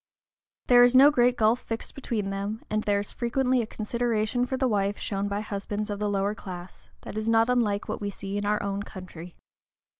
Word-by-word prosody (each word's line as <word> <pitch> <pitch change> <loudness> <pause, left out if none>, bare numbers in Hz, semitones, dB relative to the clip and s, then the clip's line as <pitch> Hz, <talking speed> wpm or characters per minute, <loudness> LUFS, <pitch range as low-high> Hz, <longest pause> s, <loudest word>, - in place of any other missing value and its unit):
There 245 -1 +6
is 245 +1 +4
no 275 +3 +8
great 245 -2 +3
gulf 220 +2 +3
fixed 225 -2 -6
between 215 -7 -3
them, 200 +3 -4
and 215 0 +1
there 205 -1 +1
is 205 - -7
frequently 250 +1 +1
a 225 - -4
consideration 235 +2 -1
for 260 - -2
the 260 0 +1
wife 205 -2 0
shown 200 0 -2
by 200 +1 -2
husbands 210 0 -4
of 205 - -4
the 210 0 0
lower 200 0 0
class, 185 -4 -10
that 215 - -5
is 215 +1 -2
not 225 +1 +4
unlike 210 -5 +1
what - - -4
we 205 - -2
see 195 0 -6
in 205 - -1
our 210 0 +1
own 200 0 -2
country. 180 -4 -10
210 Hz, 210 wpm, -27 LUFS, 200-240 Hz, -, no